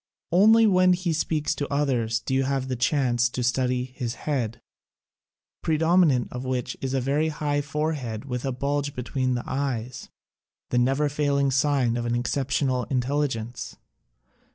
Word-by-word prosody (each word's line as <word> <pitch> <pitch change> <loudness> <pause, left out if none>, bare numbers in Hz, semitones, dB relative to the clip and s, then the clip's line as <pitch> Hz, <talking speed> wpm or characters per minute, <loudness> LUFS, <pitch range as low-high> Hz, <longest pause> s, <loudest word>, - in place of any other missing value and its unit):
Only 220 +6 +6
when 185 -3 +5
he 175 -2 -1
speaks 155 -1 0
to 145 -2 -4
others 120 -5 0
do 130 - -3
you 135 - +3
have 135 -1 -1
a - - 0
chance 120 -1 +1
to 125 +1 -3
study 125 0 +1
his 125 -2 -5
head, 125 -7 -1 1.0
predominant 160 -4 +3
of 125 +1 -5
which 125 -1 -2
is 135 0 -2
a - - +2
very 145 +5 +1
high 145 -1 -1
forehead 145 -6 -3
with 125 -2 -4
a 135 - -1
bulge 140 +2 -2
between 130 0 -1
the 120 - -3
eyes 130 -3 -3 0.3
— - - -68
the 125 - +3
neverfailing 140 +1 +1
sign 130 -3 +2
of 120 0 -2
an 120 - 0
exceptional 130 +1 0
in 130 - 0
telligence. 125 -4 -3
135 Hz, 155 wpm, -25 LUFS, 125-145 Hz, 1.0 s, Only